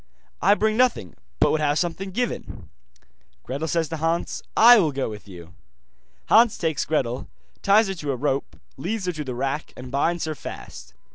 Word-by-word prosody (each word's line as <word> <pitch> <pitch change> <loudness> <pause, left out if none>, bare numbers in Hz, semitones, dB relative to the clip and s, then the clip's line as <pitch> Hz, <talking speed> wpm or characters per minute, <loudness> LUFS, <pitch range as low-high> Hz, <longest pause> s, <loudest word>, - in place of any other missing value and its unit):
'I 200 - +5
bring 215 +1 +1
nothing, 240 - +1 0.3
but - - +4
would 155 - +1
have 145 0 +1
something 180 +3 -2
given.' 240 +6 -4 0.7
Gretel 140 +5 -4
says 165 0 0
to 165 - -4
Hans: 165 +2 -1 0.2
'I 240 +1 +9
will 160 -6 +2
go 135 -4 -3
with 105 -1 -10
you.' 85 -3 -12 0.7
Hans 225 0 +5
takes 160 -3 -1
Gretel, 130 -5 -1 0.3
ties 210 +2 +4
her 195 - -2
to 150 -6 -4
a - - -1
rope, 135 +1 -2 0.2
leads 190 +8 -3
her 180 - 0
to 155 -3 -5
the 130 -3 -5
rack, 135 +4 -3
and 125 0 -9
binds 165 +5 0
her 155 - -3
fast. 145 - -10
160 Hz, 185 wpm, -24 LUFS, 135-195 Hz, 0.7 s, I